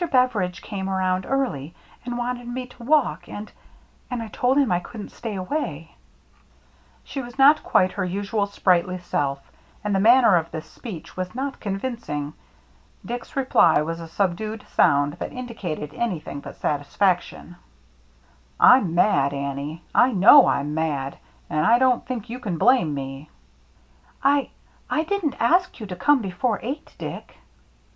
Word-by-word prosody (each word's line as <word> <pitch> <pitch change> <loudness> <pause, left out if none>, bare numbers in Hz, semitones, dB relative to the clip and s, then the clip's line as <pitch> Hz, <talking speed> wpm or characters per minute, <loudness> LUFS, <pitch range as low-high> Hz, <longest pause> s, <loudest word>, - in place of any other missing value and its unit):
Bever 255 -6 +2
idge 180 -1 -3
came 195 -2 -4
around 185 -1 0
early, 175 - -2 0.3
and 245 -1 -3
wanted 245 0 -3
me 250 +1 -4
to 245 -1 -15
walk, 295 +2 +1
and 210 +1 -7 0.3
— - - -34
and 245 -2 -3
I 225 - -8
told 250 +5 +1
him 275 -8 +3
I 175 - +2
couldn't 210 +3 -9
stay 220 -3 -6
away 185 - -4 0.4
— - - -34
" - - -33
She 275 - -5
was 245 0 -10
not 285 +3 +6
quite 185 0 +2
her 200 - -3
usual 200 +3 -1
sprightly 185 -2 +1
self; 140 -6 -3 0.3
and 210 -1 -1
the 195 - +2
manner 230 -2 +6
of 165 -1 -2
this 155 -1 -6
speech 185 -2 -10
was 185 +3 -5
not 270 +1 -4
convinc 230 +4 -4
ing. 145 0 -3 0.7
Dick's 240 0 -6
reply 260 - +4
was 165 +2 -4
a 165 - -8
subdued 205 +5 -2
sound 145 -2 +3
that - - -4
indicated 180 -12 -5
anything 175 -11 -3
but - - -10
satisfaction. 175 +4 -1 1.0
"I'm 205 -10 +6
mad, 140 -7 +3
Annie, 140 +4 -4
— - - -33
I 260 - -2
know 215 +9 +8
I'm 145 +2 0
mad 145 -4 -2
— - - -33
and 155 - 0
I 230 +8 +5
don't 255 -1 +3
think 245 -3 -4
you 240 +2 -6
can 200 -9 -3
blame 240 - +4
me." 135 +2 -7 0.9
"I 280 0 +3 0.2
— - - -34
I 310 - +1
didn't 350 -5 -2
ask 355 +9 +2
you 215 - -6
to 185 -3 -6
come 255 +7 +3
before 200 +4 -1
eight, 275 +6 -5
Dick." - - -8
200 Hz, 170 wpm, -23 LUFS, 165-250 Hz, 1.0 s, know